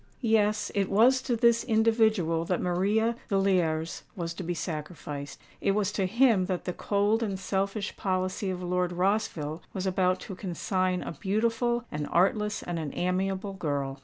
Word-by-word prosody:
Yes—it 210 -3 +1
was 245 +6 +5
to 245 - -1
this 235 0 +4
individual 220 -7 +2
that 180 +1 0
Maria 205 +6 +1
Villiers 180 -5 +1
was 170 -2 -3
to 185 - -7
be 175 0 -3
sacrificed:—it 150 0 -5
was 205 -1 +1
to 195 -2 0
him 225 -3 +3
that 185 -2 -2
the 180 - -2
cold 205 +4 +1
and 200 -4 -2
selfish 195 +1 -2
policy 185 +1 -1
of 180 -1 -4
Lord 180 0 0
Rossville 180 -5 -1
was 190 0 -2
about 185 -1 +1
to 195 - -7
consign 185 0 -1
a - - -5
beautiful, 230 +6 0
an 150 -1 -3
artless, 210 +4 +1
and 175 -1 -3
an 155 -2 -3
amiable 190 +2 -1
girl. 140 -6 -3
190 Hz, 155 wpm, -28 LUFS, 175-215 Hz, -, was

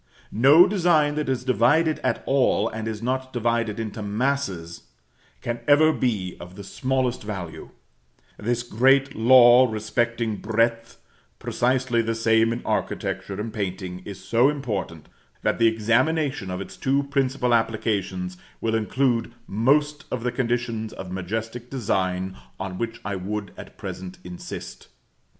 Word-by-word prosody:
No 140 - +7
design 170 -7 +3
that 150 -2 -2
is 130 -2 -1
divided 145 +6 +3
at - - -1
all, 130 -5 +2
and 110 0 -5
is 110 0 -5
not 130 +1 -2
divided 115 -3 -1
into 110 0 -5
masses, 105 -6 -2 0.6
can 120 0 -3
ever 155 +2 +6
be 105 -10 -1
of 90 +1 -10
the 100 - -9
smallest 130 +3 -1
value: 95 -6 -6 0.7
this 120 +2 -2
great 135 +4 +3
law 125 +1 +7
respecting 110 +1 -1
breadth, 115 +2 0 0.4
precisely 125 -1 +1
the 115 0 -2
same 115 0 +3
in 115 - -4
architecture 100 0 -2
and 110 +1 -4
painting, 95 -3 -4
is 100 -1 -8
so 120 +4 +3
important, 105 - -4 0.4
that - - +1
the 115 - +5
examination 125 +3 +1
of 90 +1 -4
its 95 0 -9
two 135 +6 +1
principal 135 -3 0
applications 100 -5 -1 0.2
will 115 -1 -1
include 115 +1 +1
most 145 +8 +1
of 120 -2 -3
the 125 - 0
conditions 120 -3 -2
of 95 -1 -8
majestic 110 +6 -4
design 95 -6 -1 0.2
on 95 -1 -5
which 115 -1 -3
I 100 -1 -2
would 100 +2 -4
at - - -12
present 90 0 -7
insist. 90 0 -8
115 Hz, 140 wpm, -24 LUFS, 105-130 Hz, 0.7 s, No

